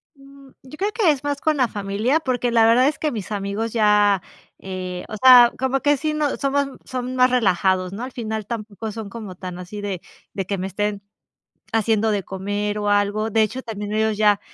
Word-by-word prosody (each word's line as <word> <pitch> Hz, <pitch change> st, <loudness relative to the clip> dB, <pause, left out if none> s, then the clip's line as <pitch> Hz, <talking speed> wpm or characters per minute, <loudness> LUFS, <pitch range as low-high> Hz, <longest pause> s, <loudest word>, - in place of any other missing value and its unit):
Mm, 275 Hz, 0 st, -17 dB
yo 270 Hz, +3 st, -12 dB
creo 405 Hz, +2 st, -1 dB
que 410 Hz, -8 st, +3 dB
es 285 Hz, -1 st, -3 dB
más 285 Hz, -1 st, -2 dB
con 310 Hz, -2 st, +1 dB
la 255 Hz, -2 st, +3 dB
familia, 210 Hz, +8 st, 0 dB
porque 250 Hz, -4 st, -1 dB
la 225 Hz, -1 st, +5 dB
verdad 245 Hz, +4 st, +5 dB
es 300 Hz, -, -1 dB
que 305 Hz, -, -1 dB
mis 215 Hz, -3 st, -6 dB
amigos 205 Hz, +3 st, -3 dB
ya, 210 Hz, -3 st, +4 dB, 0.4 s
eh 185 Hz, -1 st, -6 dB
o 215 Hz, -, -6 dB
sea, 250 Hz, -2 st, +9 dB
como 265 Hz, +1 st, 0 dB
que, 290 Hz, -1 st, +3 dB
sí, 305 Hz, +2 st, -2 dB
no 300 Hz, -2 st, 0 dB
somos 280 Hz, 0 st, 0 dB, 0.2 s
son 255 Hz, 0 st, -4 dB
más 255 Hz, 0 st, +5 dB
relajados, 190 Hz, -5 st, +1 dB
¿no? 225 Hz, +5 st, -5 dB
Al 260 Hz, -, -6 dB
final 220 Hz, -3 st, -4 dB
tampoco 220 Hz, -1 st, -6 dB
son 220 Hz, -2 st, -7 dB
como 210 Hz, -4 st, -8 dB
tan 180 Hz, -1 st, -7 dB
así 205 Hz, +3 st, -7 dB
de 195 Hz, -4 st, -4 dB, 0.3 s
de 195 Hz, -2 st, -3 dB
que 200 Hz, 0 st, -2 dB
me 185 Hz, +1 st, -3 dB
estén 205 Hz, +1 st, -2 dB, 0.7 s
haciendo 220 Hz, 0 st, +2 dB
de 200 Hz, -2 st, -1 dB
comer 205 Hz, +2 st, -3 dB
o 205 Hz, 0 st, -1 dB
algo, 205 Hz, +2 st, +1 dB
de 220 Hz, +1 st, +2 dB
hecho, 250 Hz, +5 st, -1 dB
también 210 Hz, -3 st, -6 dB
ellos 220 Hz, 0 st, +1 dB
ya, 210 Hz, -1 st, +3 dB
220 Hz, 210 wpm, -22 LUFS, 200-255 Hz, 0.7 s, sea